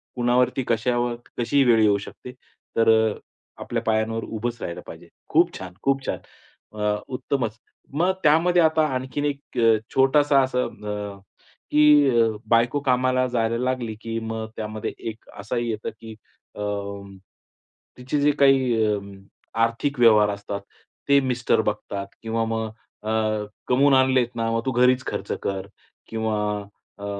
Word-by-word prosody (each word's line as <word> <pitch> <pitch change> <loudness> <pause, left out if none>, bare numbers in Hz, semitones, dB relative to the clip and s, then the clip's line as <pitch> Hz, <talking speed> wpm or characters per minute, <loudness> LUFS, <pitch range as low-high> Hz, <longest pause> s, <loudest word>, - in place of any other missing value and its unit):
कुणावरती, 125 +1 +2
कश्यावर, 120 +1 0 0.2
कशीही 135 +4 +2
वेळ 120 -3 +4
येऊ 105 -2 +4
शकते. 115 +5 -10 0.5
तर 115 0 +4 0.7
आपल्या - - -3
पायांवर 110 0 0
उभंच 120 +2 -4
राहायला 85 - -5
पाहिजे. - - -11 0.2
खूप - - +3
छान, 95 -1 -8
खूप 135 0 +1
छान - - -2 0.6
अ, 105 0 +1
उत्तमच. 125 -4 -2 0.4
मग 175 +6 +2
त्यामध्ये 170 +3 +4
आता 160 -1 +3
आणखीन 130 +3 -3
एक 140 -3 -4 0.4
छोटासा 140 +1 +4
असं 125 -1 0 0.2
अ, 105 -1 -5 0.5
की 150 -1 +6 0.4
बायको 120 +4 +3
कामाला 130 0 +2
जायला 115 +1 +1
लागली, 125 -3 -2
की 115 0 -3
मग 110 0 -4
त्यामध्ये 110 0 -4 0.2
एक 110 0 -12
असाही 120 +3 -2
येतं, 110 -1 -3
की 110 -1 -10 0.4
अ, - - -7 1.4
तिचे 130 +4 -2
जे 145 +1 +4
काही 130 -5 +4 0.8
आर्थिक 125 +4 -3
व्यवहार 110 -3 +6
असतात 100 0 -5 0.5
ते 140 0 +6
मिस्टर 125 -4 +1
बघतात. 105 -2 -3 0.2
किंवा 115 0 -1
मग 110 0 -2 0.3
अ, 110 - -4 0.6
कमवून 140 +3 +4
आणलेत 130 -2 +4
ना 115 0 -1
मग 115 0 0
तू 130 - 0
घरीच 125 +1 +3
खर्च - - -4
कर 95 -1 -3 0.4
किंवा 110 -1 -2 0.6
अ, - - -5
120 Hz, 135 wpm, -24 LUFS, 110-135 Hz, 1.4 s, की